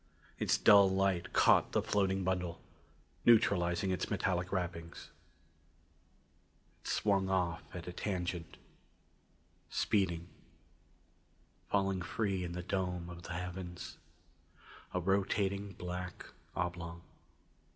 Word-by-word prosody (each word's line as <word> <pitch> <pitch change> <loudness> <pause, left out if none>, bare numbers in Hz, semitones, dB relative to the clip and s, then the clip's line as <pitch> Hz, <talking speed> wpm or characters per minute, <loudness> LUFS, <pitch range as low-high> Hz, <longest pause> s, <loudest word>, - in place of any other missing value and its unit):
Its - - +2
dull 100 +10 +7
light 95 -2 +1
caught - - +4
the - - +3
floating 95 -1 +1
bundle, 90 -2 -1 0.6
neutralizing 95 -5 +4
its 90 - -1
metallic 90 -1 0
wrappings. 85 -3 -4 1.7
It - - -11
swung 100 -2 +2
off 90 -3 +1
at 85 -1 -6
a 90 - -5
tangent. 90 -3 -3 1.1
Speeding. 85 -5 +1 1.4
Falling 95 -2 +1
free 95 0 -1
in 85 -1 -4
the 90 0 -4
dome 90 -2 -2
of 85 -1 -9
the 85 - -6
heavens. 90 0 -6 0.9
A 90 - 0
rotating 100 +1 0
black 90 0 -6 0.3
oblong. 85 -1 -3
90 Hz, 100 wpm, -34 LUFS, 85-95 Hz, 1.7 s, dull